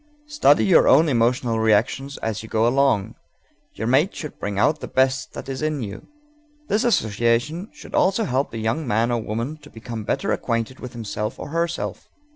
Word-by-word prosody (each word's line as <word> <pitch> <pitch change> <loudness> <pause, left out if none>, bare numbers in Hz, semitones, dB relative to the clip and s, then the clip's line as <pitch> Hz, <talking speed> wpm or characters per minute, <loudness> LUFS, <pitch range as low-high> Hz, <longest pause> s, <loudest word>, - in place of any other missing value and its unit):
Study 295 - +3
your 185 - +5
own 155 +5 +6
emotional 120 -2 +1
reactions 110 +6 +1
as 110 -2 -2
you 110 - -10
go 110 0 +2
along; 130 -5 +2 0.6
your 110 - -4
mate 135 - +2
should 150 - -7
bring 100 -1 -3
out 145 +9 +2
the - - -6
best 130 0 +1
that - - -8
is 135 0 -4
in 155 -4 -1
you._ 100 0 -8 0.6
This 210 - +2
association 120 - +1
should - - -13
also 195 +4 +2
help 135 -2 0
the 115 - -7
young 110 +7 -1
man 115 +1 +1
or 120 -1 0
woman 115 +8 -4
to - - -16
become 115 -1 -7
better - - -1
acquainted 115 +2 -2
with 125 -2 -8
himself 105 -2 -4
or - - -7
herself. 170 +2 -3
125 Hz, 185 wpm, -22 LUFS, 110-150 Hz, 0.6 s, own